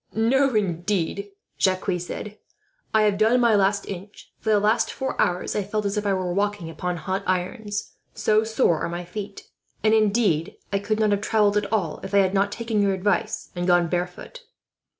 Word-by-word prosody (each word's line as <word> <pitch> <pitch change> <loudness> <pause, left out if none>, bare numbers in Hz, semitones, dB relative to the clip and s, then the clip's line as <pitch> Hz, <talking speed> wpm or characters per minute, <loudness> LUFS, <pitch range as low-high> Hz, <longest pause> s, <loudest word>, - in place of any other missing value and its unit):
"No, 260 +4 +3
indeed," 195 0 -1 0.3
Jacques 185 -1 +1
said, 210 +4 -7 0.5
"I 220 0 +4
have 205 -1 +2
done 225 +3 +4
my 235 -2 +4
last 200 0 +2
inch. 195 +2 -9
For 220 - -3
the 210 -1 +5
last 220 +3 +2
four 265 -1 -3
hours 180 0 0
I 210 - +1
felt 205 +2 -3
as 200 +1 -1
if 210 0 -2
walking 195 -1 -1
upon 180 +1 -3
hot 190 +3 -2
irons, 200 +3 -2 0.2
so 215 0 +2
sore 220 - +2
are - - -1
my 175 +1 -5
feet; 200 +2 -8 0.3
and 215 0 +4
indeed, 205 -7 +2 0.2
I 200 - +2
could 215 +2 -1
not 215 -1 +3
have 200 0 +1
travelled 210 -1 +2
at 205 -1 -1
all, 195 -8 -1
if 195 - -4
I - - +6
had 190 -1 +3
not 200 +1 +2
taken 225 -2 -1
your 200 -1 +2
advice 195 +2 -1
and 175 0 -2
gone 175 -2 +4
barefoot." 180 - -4
200 Hz, 190 wpm, -24 LUFS, 185-215 Hz, 0.5 s, I